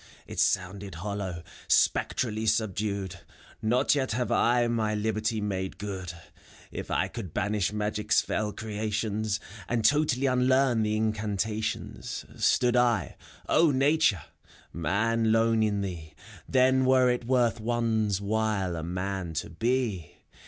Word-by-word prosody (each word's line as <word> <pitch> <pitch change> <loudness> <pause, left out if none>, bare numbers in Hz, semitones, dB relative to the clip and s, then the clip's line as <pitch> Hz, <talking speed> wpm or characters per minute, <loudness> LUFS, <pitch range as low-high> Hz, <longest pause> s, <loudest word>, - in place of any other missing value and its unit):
It - - -7
sounded 95 0 0
hollow, 95 -1 -4 0.2
spectrally 110 -2 +1
subdued: 100 -4 -1 0.4
prTot 125 +5 +3
yet 135 -4 0
have 125 +2 -1
I 120 0 +3
my 110 -2 0
liberty 110 +1 -1
made 95 -2 -3
good: 95 -3 -5 0.6
If - - -6
I - - +1
could 100 -9 -8
banish 105 -1 0
Magic's 105 0 +1
fell 105 -1 -1
creations. 110 0 -2 0.3
And 115 -2 0
totally 145 0 +3
unlearn 130 -1 +3
the 105 0 0
incantations, 110 - -2
— - - -16
Stood 125 0 +3
L 120 - +2 0.3
(LNatu 150 -3 +4
re! 95 - -8 0.6
Man^ 110 +6 +1
lone 115 0 +3
in 105 -2 +1
thee, 85 -5 -6 0.3
Then 130 0 +4
Vere 130 -1 +4
it 125 -1 -2
worth 120 -2 +2
one's 110 -3 0
while 100 -3 -1
a 80 - -4
man 90 0 -4
to 80 - -3
be! 115 - -1
110 Hz, 130 wpm, -28 LUFS, 100-120 Hz, 0.6 s, LNatu